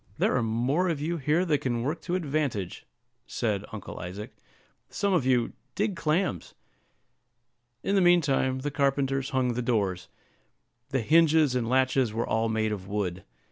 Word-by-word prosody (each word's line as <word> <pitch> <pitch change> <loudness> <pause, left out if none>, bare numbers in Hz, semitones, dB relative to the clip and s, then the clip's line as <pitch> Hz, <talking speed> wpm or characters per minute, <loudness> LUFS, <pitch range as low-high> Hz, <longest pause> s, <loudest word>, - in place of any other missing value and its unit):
"There - - +2
are 125 - +2
more 125 +11 +1
of 160 -4 -1
you 165 +4 -2
here 155 +5 +1
than 150 -5 +2
can 120 -2 -1
work 150 +6 -2
to 180 - -2
advantage," 145 - -2 0.4
said 105 -3 -2
Uncle 110 -3 -7
Isaac; 95 +4 -7 0.6
"some 200 -1 0
of 145 -8 +2
you, 125 -3 +2 0.2
dig 205 -1 0
clams." 160 - -1 1.3
In 195 - 0
the 195 - +4
mean 175 -1 +6
time 130 -3 0
the 145 +2 -2
carpenters 135 -1 0
hung 130 -2 +1
the 125 - -2
doors. 100 -7 -1 0.8
The 135 -2 0
hinges 155 +1 +4
and 120 -2 -1
latches 130 -2 +2
were 115 +2 -1
all 110 0 0
made 110 -1 0
of 95 -3 -5
wood. 95 -3 -3
130 Hz, 165 wpm, -27 LUFS, 110-155 Hz, 1.3 s, mean